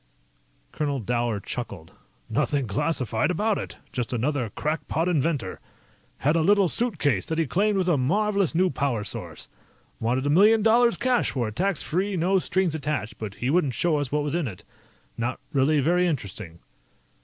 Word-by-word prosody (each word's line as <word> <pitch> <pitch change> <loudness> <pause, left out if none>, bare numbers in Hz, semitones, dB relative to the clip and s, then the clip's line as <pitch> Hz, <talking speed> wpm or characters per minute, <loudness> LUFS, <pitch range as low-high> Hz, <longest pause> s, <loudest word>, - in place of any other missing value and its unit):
Colonel 145 -3 -2
Dower 120 -1 -1
chuckled. 100 -6 -6 0.3
"Nothing 140 -3 0
classified 115 - 0
about 205 +4 +1
it. - - -7 0.2
Just 125 0 -2
another 125 0 -1
crackpot 155 - -2
inventor. 150 - 0 0.6
Had 150 +4 +1
a 165 - +3
little 200 +3 +4
suitcase 160 - 0
that 160 - -2
he 165 - +2
claimed 200 - +1
was 185 -1 +1
a 170 -5 +3
marvelous 195 +6 +1
new 185 +1 +3
power 130 -7 -1
source. - - -7 0.5
Wanted 125 +4 0
a 145 - +2
million 210 +6 +5
dollars 235 +2 +4
cash 255 -2 +1
for 120 -5 -2
it, 105 - -11
tax 190 +2 0
free, 190 +4 -1
no 185 +3 +2
strings 185 -2 0
attached, 145 -7 -3
but 105 -2 -5
he 125 +2 -1
wouldn't 150 -6 +2
show 170 -3 +1
us 145 -3 -2
what 150 0 +1
was 145 0 -2
in 170 -4 0
it. 100 -5 -9 0.5
Not 120 +2 -2
really 145 +2 +3
very 175 +5 +3
interesting." 100 - -5
150 Hz, 170 wpm, -25 LUFS, 125-180 Hz, 0.6 s, million